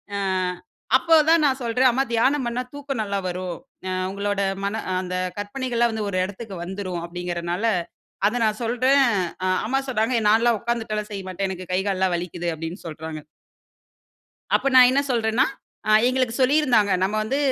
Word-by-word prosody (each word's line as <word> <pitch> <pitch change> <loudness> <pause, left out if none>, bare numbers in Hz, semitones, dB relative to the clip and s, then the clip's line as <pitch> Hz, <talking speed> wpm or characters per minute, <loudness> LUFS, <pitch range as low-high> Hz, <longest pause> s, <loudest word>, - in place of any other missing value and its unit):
அ, - - -1 0.8
அப்போ 325 +5 +3
தான் 325 -1 +5
நான் 270 -1 +1
சொல்றேன், 250 +2 +3
"அம்மா 265 +3 +1
தியானம் 260 +4 +2
பண்ணா 235 +1 -2
தூக்கம் 280 -4 -4
நல்லா 200 -1 -2
வரும். 180 -1 -4 0.3
அ, - - -2 0.2
உங்களோட 200 0 -2 0.2
மன 200 +3 -2 0.2
அந்த 185 0 -4 0.2
கற்பனைகள்லாம் 240 +2 -1
வந்து, 215 -2 -2
ஒரு 185 - -2
இடத்துக்கு 200 +1 -8
வந்துரும் 185 -1 -4
அப்பிடீங்கறதுனால", 175 +2 -3 0.6
அத 240 +4 -1
நான் 215 0 0
சொல்றேன். 255 +4 +3 0.4
அ, - - +1 0.2
அம்மா 270 +2 +1
சொல்றாங்க, 235 0 +1
"நான்லாம் 225 +1 +3
உட்காந்துட்டுலாம் 225 -3 -2
செய்ய 195 -1 -5
மாட்டேன். 190 +1 -2
எனக்கு 185 -1 -7
கை 185 - +2
கால்லாம் 190 -2 +1
வலிக்கிது", 175 0 -3
அப்டீன்னு 165 +4 -7
சொல்றாங்க. 160 0 -7 1.3
அப்ப - - +2
நான் 255 -1 +9
என்ன 270 +2 +3
சொல்றேன்னா 230 +1 +2 0.4
அ - - +3 0.2
எங்களுக்கு 255 -2 +1
சொல்லி 260 +2 +4
இருந்தாங்க. 220 -9 +3
நம்ம 195 +3 +1
வந்து 250 +6 -1
215 Hz, 160 wpm, -23 LUFS, 185-250 Hz, 1.3 s, நான்